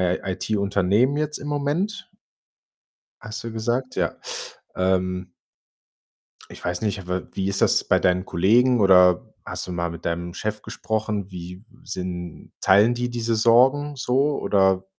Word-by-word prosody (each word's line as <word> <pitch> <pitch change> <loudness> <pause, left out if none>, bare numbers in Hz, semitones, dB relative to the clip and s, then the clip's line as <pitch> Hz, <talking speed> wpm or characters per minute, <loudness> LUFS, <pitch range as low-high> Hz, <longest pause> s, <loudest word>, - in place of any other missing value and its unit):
I - - -6
IT-Unternehmen 100 +6 +1
jetzt 150 0 -2
im 145 - -8
Moment 160 +8 -2 1.1
hast 110 -1 -7
du 115 - -5
gesagt, 120 +4 -2
ja. - - -1 0.6
Ähm 90 0 0 1.2
ich - - -12
weiß 90 +3 -2
nicht, 105 -2 -1
aber 90 0 -4
wie 95 - -1
ist 100 0 -1
das - - +3
bei - - +2
deinen 90 +1 +1
Kollegen 120 +9 +3
oder 90 -3 +5
hast - - -5
du - - -5
mal 85 -1 -2
mit 85 0 -9
deinem 85 +1 -3
Chef 105 0 -4
gesprochen? 110 -2 -3
Wie 90 +2 -9 0.2
sind 90 - -6
teilen 105 +5 +5
die 120 0 -2
diese 115 -1 -1
Sorgen 130 +6 +4
so 135 +3 +1
oder 95 -1 +2
105 Hz, 145 wpm, -23 LUFS, 90-120 Hz, 1.2 s, oder